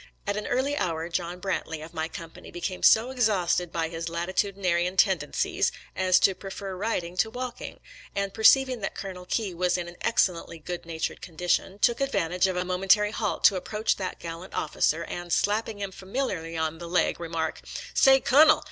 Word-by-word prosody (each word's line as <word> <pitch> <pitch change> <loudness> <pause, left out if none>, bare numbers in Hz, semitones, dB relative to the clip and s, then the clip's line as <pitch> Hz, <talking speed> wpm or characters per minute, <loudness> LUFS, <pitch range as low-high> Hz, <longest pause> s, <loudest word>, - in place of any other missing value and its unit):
At 200 -1 -1
an 210 - -4
early 265 +3 0
hour 165 - -2
John 175 +1 -3
Brantley, 165 -4 -3
of 165 +2 -11
my 160 -1 -2
company, 165 0 -10
became 180 +1 -4
so 230 +4 +5
exhausted 190 -8 +1
by 165 -1 -1
his 165 0 -5
lati 170 +2 -3
tudinarian 185 -2 0
tendencies 180 -8 +2 0.2
as 185 -1 +4
to 195 - +5
prefer 195 0 -7
riding 180 -3 -2
to 220 - +2
walk 250 +1 -6
ing, - - -8 0.4
and 200 0 -1
perceiving 255 +3 +5
that 195 - -3
Colonel 185 -2 -7
Key 205 -3 -1
was 180 +1 +1
in 175 -1 -4
an 175 0 -11
excellently 170 -2 +1
good 170 +2 -6
natured 160 -1 -3
condition, 180 +3 -1
took 235 +3 +2
advan 275 -12 0
tage 180 +1 +2
of 185 -1 -2
a 180 - -1
momentary 195 +3 +3
halt - - -2
to 195 - +7
approach 215 +4 -1
that 185 -2 -4
gal 165 -1 -6
lant 185 +2 -10
officer, 160 +1 0
and, 175 +1 -6
slapping 210 +3 0
him 200 -1 -3
familiarly 190 -5 -4
on 160 0 -2
the 170 -1 -7
leg, 180 - +1
remark, 165 -1 -3 0.2
" - - -12
Say, 270 0 +6
Kunnel 300 +5 +6
185 Hz, 190 wpm, -27 LUFS, 170-205 Hz, 0.4 s, to